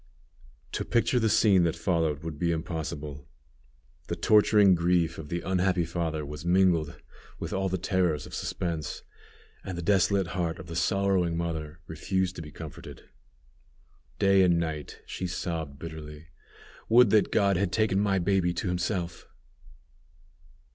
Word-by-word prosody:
To - - -2
picture 120 +1 +1
the 110 -1 +2
scene 105 -3 +4
that 85 -1 +1
followed 80 -4 0
would 80 -3 -6
be 85 -1 +1
impossible. 75 -4 -5 0.8
The - - -2
torturing 105 -2 +5
grief 85 -1 +1
of 75 -2 -8
the 85 0 -2
unhappy 90 -1 +1
father 80 -2 -3
was 75 +2 -8
mingled 85 -4 +2 0.4
with - - -5
all 95 0 0
the 95 - -1
terrors 90 -5 0
of - - -12
suspense, 80 -4 -4 0.6
and 90 -2 -6
the 85 - -4
desolate 95 -1 +2
heart 85 -2 -2
of - - -9
the 85 0 -8
sorrowing 90 -1 +1
mother 80 -2 -4
refused 95 +3 -2
to - - -5
be 75 - -9
comforted. 80 0 -10 1.1
Day 100 -1 +4
and 90 -2 +4
night 80 -3 -4
she 95 - -4
sobbed 80 -5 -4
bitterly, 80 0 -9 0.6
"Would 120 -2 +6
that 110 -2 +3
God 100 -2 +3
had 90 0 0
taken 105 -2 +1
my 100 -1 +2
baby 90 -1 +1
to 90 - -2
himself!" 90 0 -3
85 Hz, 145 wpm, -28 LUFS, 80-95 Hz, 1.1 s, Would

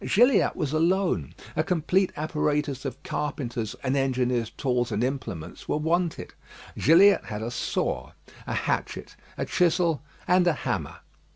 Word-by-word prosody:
Gilliatt 245 +1 +4
was 150 -1 -2
alone; 170 - +1 0.2
a 155 - +2
complete 180 +2 +1
apparatus 150 -2 -1
of 135 -2 -5
carpenters' 120 -7 -3
and 130 0 0
engineers' 125 -3 +1
tools 125 -3 -1
and 105 +2 0
implements 120 - -5
were - - +1
wanted. 165 +2 -1 0.4
Gilliatt 180 +8 +5
had 105 0 -5
a 115 - -3
saw, 70 - -2 0.3
a - - -2
hatchet, - - -2 0.2
a - - -1
chisel, 170 -3 +2 0.3
and 180 0 +4
a 175 - +4
hammer. 130 - -3
150 Hz, 135 wpm, -26 LUFS, 125-170 Hz, 0.4 s, Gilliatt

